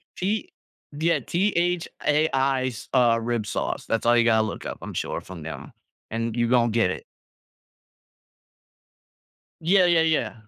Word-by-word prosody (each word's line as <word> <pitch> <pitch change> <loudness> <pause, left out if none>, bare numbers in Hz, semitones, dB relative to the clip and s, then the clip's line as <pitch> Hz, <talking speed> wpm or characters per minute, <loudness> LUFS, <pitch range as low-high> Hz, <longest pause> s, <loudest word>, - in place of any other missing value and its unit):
T 205 +4 -2 0.4
Yeah. 160 +3 +1
T-H-A-I's, 150 - 0
uh, 120 -3 +4
rib 115 -2 -1
sauce. 105 - -3
That's 115 0 -1
all 120 +1 +5
you 120 - +5
gotta 110 -2 +3
look - - -7
up, - - -5
I'm - - -7
sure, - - -3
from 90 -4 -10
them. 80 - -8 0.4
And 115 0 -2
you 120 -1 +1
gonna 120 -2 +3
get 110 -5 +2
it. - - -6 2.6
Yeah, 180 +3 +4
yeah, 170 -2 +4
yeah. 160 -1 +1
125 Hz, 135 wpm, -25 LUFS, 115-165 Hz, 2.6 s, all